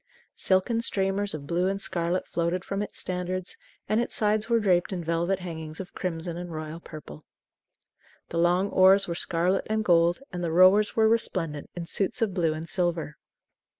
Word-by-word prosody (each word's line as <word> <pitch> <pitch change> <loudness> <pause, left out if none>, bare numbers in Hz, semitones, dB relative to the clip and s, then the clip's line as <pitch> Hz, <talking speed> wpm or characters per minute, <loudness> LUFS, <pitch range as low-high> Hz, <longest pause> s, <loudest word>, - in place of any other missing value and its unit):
Silken 200 +5 +2
streamers 195 -3 0
of 140 -2 -8
blue 175 +4 0
and 195 +1 -1
scarlet 175 -1 -1
floated 170 +2 -2
from 195 0 -2
its 210 - -5
standards; 180 0 -3 0.3
and 215 +2 +2
its 240 - -3
sides 215 +1 +1
were 230 -1 +4
draped 185 -4 +2
in 180 -3 -3
velvet 170 +3 0
hangings 160 -3 -7
of 190 -1 -8
crimson 170 -2 -4
and 175 0 -6
royal 155 +1 -6
purple. 150 - -11 1.1
The 165 - -2
long 180 +3 +2
oars 190 +1 +6
were 170 - -2
scarlet 175 +2 0
and 220 0 0
gold, 170 +4 +3
and 175 0 -4
the 165 - -1
rowers 185 +5 +5
were 220 -1 +4
resplendent 180 -10 -1
in 175 -1 -5
suits 195 +6 -2
of 205 -4 -1
blue 170 -4 +1
and 160 +1 -6
silver. 165 -1 -2
180 Hz, 180 wpm, -27 LUFS, 170-195 Hz, 1.1 s, oars